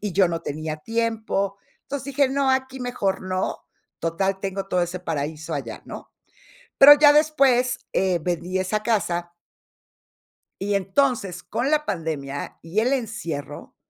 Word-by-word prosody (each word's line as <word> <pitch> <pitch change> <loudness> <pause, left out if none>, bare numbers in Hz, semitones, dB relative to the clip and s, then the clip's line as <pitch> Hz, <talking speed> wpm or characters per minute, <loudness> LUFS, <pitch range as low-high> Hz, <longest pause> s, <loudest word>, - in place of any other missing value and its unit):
y 205 -3 -3
yo 190 0 +4
no 165 -1 -3
tenía 155 0 -4
tiempo. 220 -1 -1 0.3
Entonces 280 -1 -5
dije: 280 -2 +4
"No, 275 0 +1
aquí 260 0 -1
mejor 225 -6 -1
no, 185 0 -2 0.4
total, 190 +4 -1
tengo 195 0 -3
todo 180 -2 +1
ese 175 +1 -3
paraíso 155 -2 -4
allá", - - -5
¿no? - - -9 0.7
Pero, 285 +2 +11
ya 290 0 +7
después 275 -5 +3
eh, 185 -2 +1
vendí 180 +2 -2
esa 210 +3 -1
casa 175 -6 -1 1.3
y 200 +1 0
entonces, 200 0 0
con 275 +4 -2
la 300 0 +2
pandemia 145 - -4
y 165 +6 -1
el 250 +5 +2
encierro, 215 - -5
195 Hz, 140 wpm, -23 LUFS, 175-250 Hz, 1.3 s, Pero